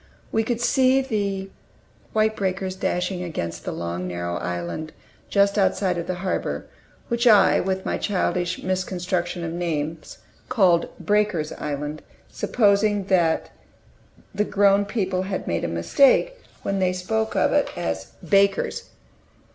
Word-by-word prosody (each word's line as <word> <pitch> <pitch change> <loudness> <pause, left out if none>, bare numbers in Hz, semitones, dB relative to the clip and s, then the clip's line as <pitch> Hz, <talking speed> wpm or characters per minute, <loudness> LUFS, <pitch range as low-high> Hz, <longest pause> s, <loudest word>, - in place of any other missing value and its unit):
We 225 - +2
could 235 +1 -2
see 260 +2 +3
the 200 -6 -2 0.6
white 220 0 +2
breakers 190 -1 -2
dashing 180 -1 -1
against 85 - -5
the - - -2
long 85 +1 -4
narrow 85 -1 -3
island 90 - -4 0.4
just 200 +1 +3
outside 190 -2 +1
of 170 - -5
the 185 - -1
harbor, 185 - -2 0.4
which 235 +1 +1
I, 210 -4 +6
with 190 0 -2
my - - -1
childish 180 -3 -1
misconstruction 180 -1 -2
of 165 -1 -3
names, 160 -2 -3 0.3
called 180 -6 +3
"Breakers' 205 -7 +1
Island"; 150 +1 -4 0.3
supposing 205 -2 +2
that 170 -3 +2 0.8
the 205 +1 +1
grown 200 -1 +3
people 190 -3 -1
had 190 0 -3
made 85 0 -1
a - - 0
mistake 260 - +3 0.3
when 195 0 -1
they 185 -1 +2
spoke 220 +5 -2
of - - +3
it - - +2
as - - -3 0.2
"Baker's." 200 -1 +2
185 Hz, 135 wpm, -23 LUFS, 170-205 Hz, 0.8 s, I